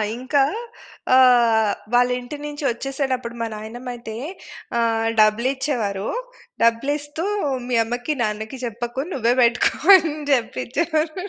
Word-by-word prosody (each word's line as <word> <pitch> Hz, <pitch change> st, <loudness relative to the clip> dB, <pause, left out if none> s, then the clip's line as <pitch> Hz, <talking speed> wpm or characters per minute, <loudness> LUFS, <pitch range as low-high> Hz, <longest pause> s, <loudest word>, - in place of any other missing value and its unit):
ఇంక 255 Hz, +4 st, -6 dB, 0.8 s
ఆహ్, 235 Hz, -5 st, +5 dB, 0.2 s
వాళ్ళింటి 250 Hz, +3 st, +1 dB
నుంచి 295 Hz, 0 st, -6 dB
ఒచ్చేసేటప్పుడు 255 Hz, -1 st, -3 dB
మా 230 Hz, -, -1 dB
నాయనమ్మయితే 235 Hz, +1 st, -7 dB, 0.6 s
ఆహ్, 225 Hz, -1 st, +1 dB
డబ్బులిచ్చేవారు. 225 Hz, -2 st, +1 dB, 0.5 s
డబ్బులిస్తూ 290 Hz, +7 st, 0 dB, 0.4 s
"మీ 250 Hz, -, 0 dB
అమ్మకి, 245 Hz, +6 st, -3 dB
నాన్నకి 220 Hz, +4 st, -4 dB
చెప్పకు 240 Hz, +2 st, -5 dB
నువ్వే 240 Hz, -2 st, +2 dB
బెట్టుకో" 240 Hz, 0 st, +3 dB, 0.3 s
అనే 320 Hz, -4 st, -2 dB, 0.2 s
జెప్పిచ్చేవారు. 305 Hz, +6 st, 0 dB
245 Hz, 95 wpm, -22 LUFS, 230-270 Hz, 0.8 s, ఆహ్